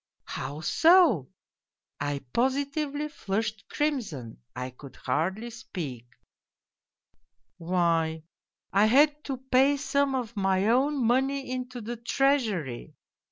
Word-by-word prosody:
How 145 +4 -5
so? 320 - +5 0.4
' - - -64
I 140 -1 -3
positively 285 +3 0
flushed 215 -5 -3
crimson, 220 - -2 0.2
I 125 0 -4
could 135 +2 -13
hardly 185 - -2
speak. 150 - -7 0.6
" - - -65
' 120 - -48
Why, 165 -2 +1 0.5
I 200 +2 +5
had 295 +5 +4
to 270 -2 -3
pay 265 +2 +3
some 280 -1 +1
of 235 -3 -3
my 195 0 +1
own 265 +2 +2
money 265 +2 +1
into 250 -1 -4
the 235 +2 -5
Treasury. 230 - 0
235 Hz, 115 wpm, -27 LUFS, 165-275 Hz, 0.6 s, so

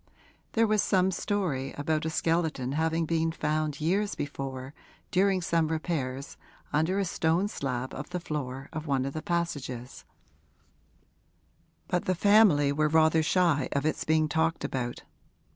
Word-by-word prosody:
There 230 0 +4
was 215 -1 +2
some 190 0 +2
story 175 -9 -2
about 155 +2 -1
a - - 0
skeleton 160 -5 0
having 160 +2 0
been 165 0 +1
found 155 -1 -1
years 195 +7 0
before, 135 -1 -5 0.4
during 190 -1 +2
some 165 -1 +1
repairs, 155 -5 -3 0.4
under 160 +6 +2
a 200 - +1
stone 170 +2 +1
slab 130 - -3
of 135 - -6
the 180 0 -3
floor 135 -5 -5
of 155 +1 -5
one 135 -2 +1
of 135 - -4
the 155 - -4
passages; 145 -9 -3 1.8
but 180 - -1
the 185 - +1
family 190 -8 +5
were 150 +2 +2
rather 160 +1 +4
shy 155 -4 +2
of 140 +1 0
its 155 - 0
being 155 0 +2
talked 160 +2 0
about. 120 -2 -3
160 Hz, 145 wpm, -28 LUFS, 140-175 Hz, 1.8 s, family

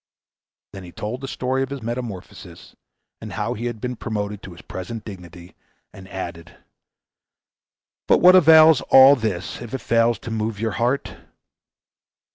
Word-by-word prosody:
Then 95 - -9
he 90 - -11
told 110 +8 -6
the 135 - -6
story 130 +1 -2
of 135 - -2
his 140 -3 -7
metamorphosis, 110 -7 -8 0.5
and - - -8
how - - -3
he 120 +3 -5
had 120 -2 -6
been 125 +2 -4
promoted 105 -3 -5
to 95 - -11
his 85 - -15
present 105 +4 -8
dignity, 90 -3 -11 0.4
and 95 0 -13
added, 85 -4 -8 1.5
"But - - +5
what 180 +1 +6
avails 160 -4 +7
all 135 +1 +8
this 110 -7 -4
if 120 +1 -7
it 135 - -6
fails 115 0 +1
to 115 - -7
move 110 -1 -3
your 110 0 -2
heart?" 120 +6 -2
115 Hz, 155 wpm, -21 LUFS, 95-125 Hz, 1.5 s, all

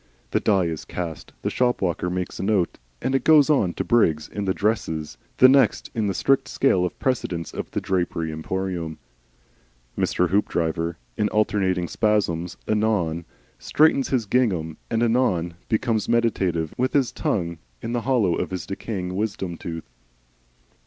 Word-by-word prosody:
The - - +2
die 95 -4 +2
is 80 -2 -3
cast. 85 -3 -6
The - - 0
shop 125 -1 +1
walker 90 -1 -1
makes 90 0 -3
a - - -2
note 95 -3 +1 0.2
of - - -7
it 130 - +1
and 135 -2 +1
goes 155 -2 +6
on 95 - +2
to - - -1
Briggs 80 -11 +2
in 100 -1 -4
the 95 - +1
"dresses," 80 -8 -1 0.2
the 130 - +8
next 135 +1 +3
in 110 -3 0
the 100 - -1
strict 135 +7 +2
scale 95 -10 +2
of 90 - -5
precedence 90 - -2
of - - -5
the - - -2
Drapery 85 -3 -1
Emporium. 85 0 -3 1.0
Mr. 90 -1 +1
Hoopdriver 85 -3 0 0.2
in 105 - +1
alternating 95 -4 +1
spasms 90 -6 0
anon 105 -7 0 0.3
straightens 150 -3 +3
his 125 -5 +1
gingham 95 -9 0
and 115 0 +1
anon 110 -8 +1 0.2
becomes 110 -1 0
meditative, 95 -9 +1
with 130 +1 +1
his 135 -4 +2
tongue 85 -4 -2 0.2
in 115 - -3
the 120 0 0
hollow 115 -9 +2
of - - -2
his 95 -1 -4
decaying 95 -2 -4
wisdom 95 -4 -2
tooth. 80 -1 -7
95 Hz, 160 wpm, -24 LUFS, 85-115 Hz, 1.0 s, the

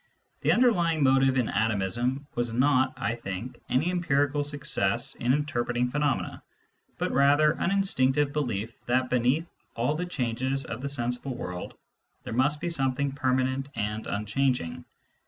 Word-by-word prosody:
The - - +2
underlying 175 - +3
motive 135 0 +4
in 125 -3 +2
atomism 110 +6 0
was 120 -1 -2
not, 130 +1 +3
I 130 -3 -1
think, 115 +1 -6
any 155 +8 +2
empirical 145 -5 +1
success 135 -4 0
in 125 -1 0
inter 145 -3 0
preting 120 +1 -1
phenomena, 145 -2 -1 0.6
but - - -1
rather 145 +3 +5
an 170 - -1
instinctiye 145 -8 +2
belief 115 -7 -2
th 120 +1 +3
at 130 - -9
beneath 125 +7 +2 0.3
all 120 +5 +1
the 175 +3 -3
changes 130 -2 -1
of - - -6
the 140 - -3
sensible 125 0 -2
world 90 -6 -6 0.5
there^must 145 +6 +1
he 175 - -1
something 135 -3 0
permanent 130 0 0
and 105 +1 -3
unchanging. 105 -2 -1
130 Hz, 145 wpm, -27 LUFS, 120-145 Hz, 0.6 s, rather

